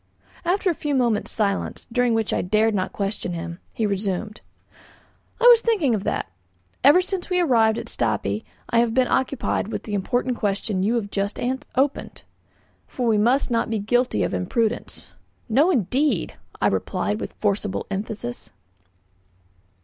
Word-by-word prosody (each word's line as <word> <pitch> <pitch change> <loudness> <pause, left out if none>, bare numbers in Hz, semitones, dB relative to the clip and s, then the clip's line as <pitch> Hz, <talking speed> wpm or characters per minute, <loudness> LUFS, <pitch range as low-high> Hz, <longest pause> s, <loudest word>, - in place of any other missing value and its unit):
After 365 +2 +1
a - - -1
few 295 -2 -2
moments' 235 -5 +1
silence, 200 -3 -1
during 245 -1 +2
which 225 -2 0
I - - +1
dared 215 +4 +2
not 185 -2 -1
question 195 -3 -3
him, 170 +1 -6
he 225 - -1
resumed: 200 +1 -2 1.0
"I - - -4
was 480 -2 +9
thinking 395 - +2
of 205 -2 -2
that. 95 - -2 0.5
Ever 295 +7 +7
since 375 -1 -4
we 360 -1 +2
arrived 230 -9 +3
at - - -4
Stapi 105 -2 -1 0.2
I 230 - +2
have 230 -1 +1
been 255 -1 +3
occupied 260 -5 0
with - - -4
the 210 - -6
important 245 +5 0
question 200 -1 -1
you 215 +5 +1
have 205 -4 -2
just 200 +1 -2 0.4
opened, 275 +2 -1 0.6
for 250 - -3
we 215 -2 +3
must 245 +5 +2
not 230 -1 +1
be 225 - 0
guilty 245 +5 +1
of - - -2
imprudence." 220 - -2 0.4
"No, 270 +9 +4
indeed!" 270 - +1 0.3
I - - +1
replied 210 +1 0
with - - -6
forcible 205 -1 -1
emphasis. 195 - -5
225 Hz, 155 wpm, -23 LUFS, 200-260 Hz, 1.0 s, was